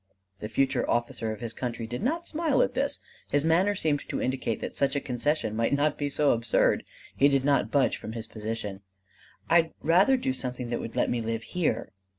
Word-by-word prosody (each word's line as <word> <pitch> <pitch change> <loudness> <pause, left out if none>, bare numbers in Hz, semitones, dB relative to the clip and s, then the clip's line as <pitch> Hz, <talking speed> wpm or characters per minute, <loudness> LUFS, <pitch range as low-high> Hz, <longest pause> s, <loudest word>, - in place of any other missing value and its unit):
The 105 - -5
future 135 +2 +1
officer 120 -1 0
of 110 - -7
his 115 -1 -4
country 120 -2 -4
did 120 +6 -5
not 325 +9 -1
smile 315 -3 +2
at - - -1
this: - - -1 0.3
his 145 +1 +1
manner 185 +5 +3
seemed 155 -5 +1
to - - -2
indicate 130 -4 -1
that - - -5
such 140 0 +1
a - - +2
concession 125 -3 -1
might 115 +4 +1
not 145 +1 +2
be 145 -1 -2
so 145 +1 +3
absurd. 115 -1 +2 0.3
He 140 - +5
did 135 -1 +2
not 140 -1 +3
budge 140 -2 +2
from 110 - -7
his 115 -1 -5
position: 110 -3 -5 0.7
"I'd 165 -1 +4
rather 190 +11 +4
do 130 - -1
something 125 -2 -5
that 120 - -1
would 115 - -6
let - - +1
me 120 - 0
live 115 0 -3
here." 155 -10 -1
130 Hz, 205 wpm, -28 LUFS, 115-155 Hz, 0.7 s, He